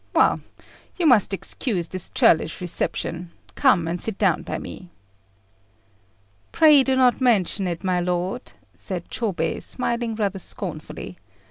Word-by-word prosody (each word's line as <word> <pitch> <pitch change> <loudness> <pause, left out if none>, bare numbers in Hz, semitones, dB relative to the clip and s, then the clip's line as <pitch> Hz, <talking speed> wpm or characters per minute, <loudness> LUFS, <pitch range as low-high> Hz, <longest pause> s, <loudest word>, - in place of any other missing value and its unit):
Well, - - +4 0.6
you 355 - 0
must 240 -10 +5
excuse 195 -2 -2
this 185 -2 -7
churlish 160 0 +3
reception: 175 -1 -3 0.2
come 190 - +3
and 170 +1 -3
sit 220 -3 -1
down 190 -6 +2
by - - -4
me." 180 - -9 1.6
"Pray 305 -3 +6
do 265 0 +1
not 255 0 +3
mention 205 -5 +2
it, 170 0 -4
my 185 -1 +1
lord," 180 +6 -3 0.2
said 180 -3 -6
Chôbei, 215 -7 -2
smiling 235 -2 -1
rather 200 -3 -2
scornfully. 90 - -7
195 Hz, 130 wpm, -23 LUFS, 175-245 Hz, 1.6 s, Pray